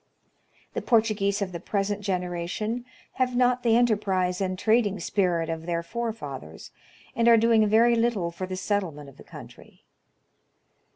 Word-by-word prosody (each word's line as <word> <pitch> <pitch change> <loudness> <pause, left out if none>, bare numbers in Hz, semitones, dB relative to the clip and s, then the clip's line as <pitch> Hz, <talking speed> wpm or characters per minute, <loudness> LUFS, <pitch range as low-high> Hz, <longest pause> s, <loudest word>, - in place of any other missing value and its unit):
The - - -3
Portuguese 215 -3 +1
of 185 - -5
the 170 - -6
present 200 +3 -2
generation 185 +5 -3 0.3
have 255 -1 -1
not 250 0 +2
the 230 -1 +3
enterprise 195 -6 +1
and 185 -1 -1
trading 215 -1 +2
spirit 175 -3 0
of 165 0 -5
their 170 -1 -1
forefathers, 170 - -6 0.4
and 235 0 +2
are 230 -1 +7
doing 225 -1 +4
very 230 +3 +4
little 230 -7 0
for 185 +2 -6
the 185 0 -5
settlement 180 -8 -3
of 135 - -18
the - - -13
country. - - -14
200 Hz, 150 wpm, -26 LUFS, 180-230 Hz, 0.4 s, are